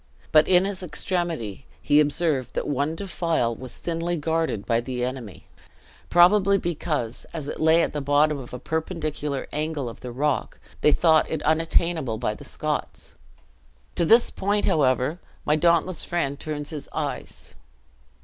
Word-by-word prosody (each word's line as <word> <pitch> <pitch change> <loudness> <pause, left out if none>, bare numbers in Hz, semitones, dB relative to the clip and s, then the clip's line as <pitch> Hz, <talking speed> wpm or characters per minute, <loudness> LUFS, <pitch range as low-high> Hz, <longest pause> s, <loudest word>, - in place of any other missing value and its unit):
But 155 0 +6
in 185 0 +5
his 195 -1 -4
extremity, 170 - -3
he 145 - +3
observed 150 -3 0
that - - -2
one 145 +3 -1
defile 165 -9 -1
was 130 +1 -8
thinly 170 +1 -2
guarded 160 -8 -1
by 115 -1 +1
the 125 0 -3
enemy; 125 -7 -7 0.6
probably 195 +3 +5
because, 155 -9 -3
as 155 -4 -5
it - - -5
lay 160 +1 +5
at - - -2
the 150 - -2
bottom 145 +1 +2
of 125 - -10
a 125 - -5
perpendicular 155 -2 -3
angle 150 -3 -2
of 115 - -8
the 125 - -6
rock, 135 0 -1 0.2
they 150 - +5
thought 160 0 +4
it 160 - -3
unattainable 160 -5 +1
by 110 -2 -1
the - - -11
Scots. - - -4 0.8
To - - +1
this 230 +8 +5
point, 205 +1 0
however, 135 +2 +2 0.3
my 150 - +3
dauntless 170 +2 +2
friend 145 -5 -2
turns 150 -1 -5
his 150 -3 -6
eyes. - - -5
155 Hz, 155 wpm, -24 LUFS, 135-170 Hz, 0.8 s, But